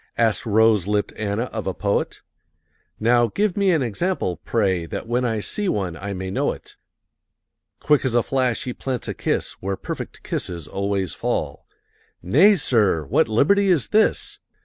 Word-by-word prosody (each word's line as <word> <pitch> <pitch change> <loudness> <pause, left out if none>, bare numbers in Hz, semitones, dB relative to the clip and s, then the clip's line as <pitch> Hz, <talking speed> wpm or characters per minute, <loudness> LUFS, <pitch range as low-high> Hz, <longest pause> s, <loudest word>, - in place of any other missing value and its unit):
Asked 115 -1 +1
rose 110 -3 +3
lipped 105 0 0
Anna 105 +1 -2
of 110 -5 -5
a 95 - -2
poet. 100 -1 -1 0.8
"Now 120 +1 +3
give 200 - -1
me 200 -1 +2
an 160 -6 +2
example, 120 - -2
pray, 95 -3 0
That 115 - -6
when 120 +2 0
I 115 -3 -1
see 205 - -1
one 95 - -2
I 100 +4 -6
may 95 -1 -4
know - - 0
it." - - -14 1.0
Quick 150 -1 +2
as 130 -3 0
a 120 - +4
flash 130 -3 0
he 125 - -4
plants 130 -1 -4
a - - -2
kiss - - -1
Where 95 0 -2
perfect - - -7
kisses 85 -4 -4
always 100 -4 -2
fall. - - -3 0.6
"Nay, 200 - +5
sir! 105 - +2
what 70 - +2
liberty 195 - +3
is 165 -9 +2
this?" 215 0 +1
110 Hz, 170 wpm, -22 LUFS, 100-130 Hz, 1.0 s, Nay